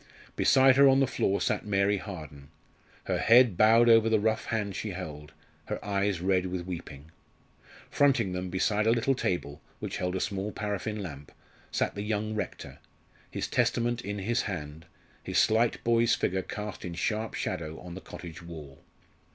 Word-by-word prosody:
Beside 130 0 +5
her 140 0 +8
on 135 0 +4
the 135 - +4
floor 100 -6 0
sat - - 0
Mary 100 0 +1
Harden, 75 -8 -9 0.5
her - - -1
head 115 -3 +6
bowed 115 +5 +5
over 115 -1 +6
the 110 -1 +3
rough 110 +1 0
hand 105 -4 -2
she 105 -3 -4
held, 75 -5 -7 0.3
her - - -3
eyes 100 -3 0
red 95 0 +1
with 90 -1 -4
weeping. 80 -4 -8 0.8
Fronting 135 -9 +3
them, 90 0 -4
beside 105 +4 +1
a - - +5
little 120 +3 +2
table, 85 - -3 0.2
which - - -5
held 90 0 -2
a - - -1
small 100 +2 -2
paraffin 105 0 -3
lamp, 75 -5 -9 0.4
sat - - -1
the 100 - -5
young 105 0 -2
rector, 110 - -5 0.5
his - - -3
Testament 120 0 0
in 105 -1 -5
his 115 +5 0
hand, 80 -5 -6 0.3
his - - -3
slight 115 +2 +3
boy's 115 0 +3
figure 95 0 -1
cast 105 +2 -6
in 85 -2 -5
sharp 110 +5 -2
shadow 80 0 -4
on 90 -1 -9
the 95 - -8
cottage 85 -1 -10
wall. 80 -5 -11
100 Hz, 170 wpm, -28 LUFS, 90-110 Hz, 0.8 s, her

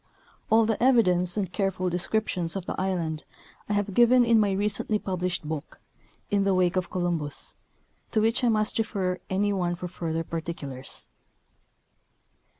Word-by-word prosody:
All 225 0 +5
the 225 -1 -1
evidence, 185 -8 +3
and 190 -3 -2
careful 195 -2 0
descriptions 180 -1 -1
of 190 -3 -4
the - - -3
island, 170 -5 -2 0.5
I - - +1
have 205 -1 0
given 240 +3 +6
in 230 -1 +5
my 205 -2 +3
recently 210 +2 0
published 180 -5 -2
book. 155 -1 -5 0.3
" - - -35
In 200 -1 +3
the 195 -1 +2
Wake 180 -1 +2
of 185 -1 -1
Columbus/' 170 -5 -2 0.6
to 220 - +1
which 225 +3 +2
I 240 - +4
must 215 0 +1
refer 190 -5 -1
any 205 +2 +1
one 175 -2 0
for 180 +1 -5
fur 170 -2 -4
ther 165 +1 -1
particulars. 160 -6 -4
185 Hz, 160 wpm, -27 LUFS, 175-210 Hz, 0.6 s, given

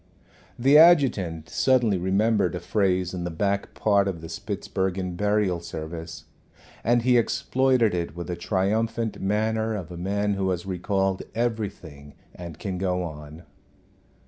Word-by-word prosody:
The 135 +5 +6
adjutant 120 - +4
suddenly 120 -7 +2
remembered 100 +1 +1
a - - -3
phrase 90 -1 0
in 90 -1 -4
the 85 - -2
back 100 +4 -2
part 100 -2 +2
of 90 -4 -4
the 80 - -8
Spitzbergen 95 -1 -3
burial 105 -2 +1
service, 80 0 -7 0.6
and 120 +1 +2
he 125 -1 +5
exploited 130 -1 +1
it 85 -3 -3
with 85 0 -5
the 90 - -4
triumphant 110 +5 -1
manner 110 +2 0
of 90 -4 -6
a 85 - -7
man 100 +3 -1
who 95 -1 -1
has 90 -1 -2
recalled 95 +1 -1
everything, 100 -11 -4 0.2
and 85 -3 -9
can 95 -2 -4
go 90 -1 0
on. 75 0 -9
95 Hz, 145 wpm, -25 LUFS, 85-110 Hz, 0.6 s, The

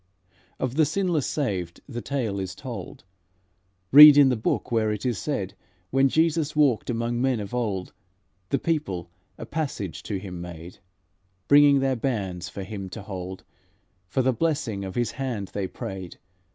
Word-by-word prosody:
"Of 130 +2 -2
the 160 - +5
sinless 170 -3 0
saved 95 - -3
the 120 -4 -5
tale 115 -8 -2
is 95 -1 -4
told, - - -8 0.9
Read 150 +1 +11
in 140 -2 +7
the 125 - +2
Book 110 +2 -2
where 110 -2 +2
it 105 +3 -4
is 120 -4 0
said: 100 -11 -3 0.4
When 135 +1 +4
Jesus 160 0 +1
walked, 135 -8 +2
among 120 0 -1
men 130 -3 +1
of 100 +2 -6
old, 105 -7 -2 0.6
The 140 - +2
people 100 - -2 0.3
a - - -7
passage 130 - -4
to 100 - -4
Him 90 -2 -7
made; 85 0 -9 0.7
Bringing 145 -1 +6
their 135 -1 +1
bairns 100 -8 -3
for 100 - -6
Him 95 -1 -6
to 105 +2 -8
hold, 95 -2 -7 0.6
For 130 +7 0
the 130 0 +2
blessing 140 -8 -1
of 95 -1 -6
His 120 -1 0
hand 120 -8 -4
they 100 -2 -3
prayed. 95 -1 -7
115 Hz, 165 wpm, -25 LUFS, 95-140 Hz, 0.9 s, Read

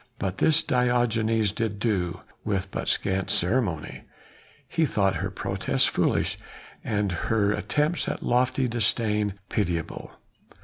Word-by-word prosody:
But 95 -1 -3
this 160 0 +4
Diogenes 115 -4 +2
did 110 -1 -2
do, 95 -6 -1 0.2
with 95 -2 -2
but - - -3
scant 95 -1 0
ceremony; 90 - 0 0.6
he 160 -2 +1
thought 95 -5 +1
her 95 - -2
protests 100 +7 0
foolish, - - 0 0.4
and 105 -3 0 0.2
her 105 -3 +2
attempts 150 +9 0
at - - -3
lofty 130 +1 +2
disdain 105 -3 +1
pitiable. 85 -5 -2
105 Hz, 120 wpm, -26 LUFS, 95-120 Hz, 0.6 s, this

